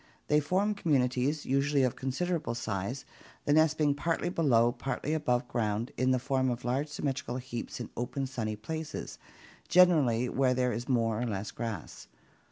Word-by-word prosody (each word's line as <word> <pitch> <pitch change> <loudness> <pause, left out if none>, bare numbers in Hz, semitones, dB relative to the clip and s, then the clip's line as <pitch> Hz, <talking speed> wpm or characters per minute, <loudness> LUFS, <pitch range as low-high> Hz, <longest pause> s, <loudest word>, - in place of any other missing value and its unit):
They 150 - +5
form 185 +8 +1
communities, 140 -4 +1
usually 140 +1 +2
of 125 - +1
considerable 150 +1 -2
size, 115 +3 -3 0.4
the 145 - +3
nests 155 0 +4
being 150 -2 +2
partly 165 +4 -1
below, 120 -9 +3
partly 135 +4 -3
above 125 -6 0
ground 115 -1 -1
in 130 0 +1
the 130 - +4
form 130 0 0
of 120 0 -3
large 130 +5 0
symmetrical 135 -4 -3
heaps 125 -2 -6
in 120 - -6
open 125 +3 -2
sunny 115 -5 -3
places, 160 +9 -6 0.5
generally 150 -10 +5
where 130 0 +2
there 125 -1 +1
is 120 +4 -5
more 115 -3 +1
or 125 - -1
less 105 -2 -3
grass. 115 -8 -6
130 Hz, 165 wpm, -30 LUFS, 120-150 Hz, 0.5 s, They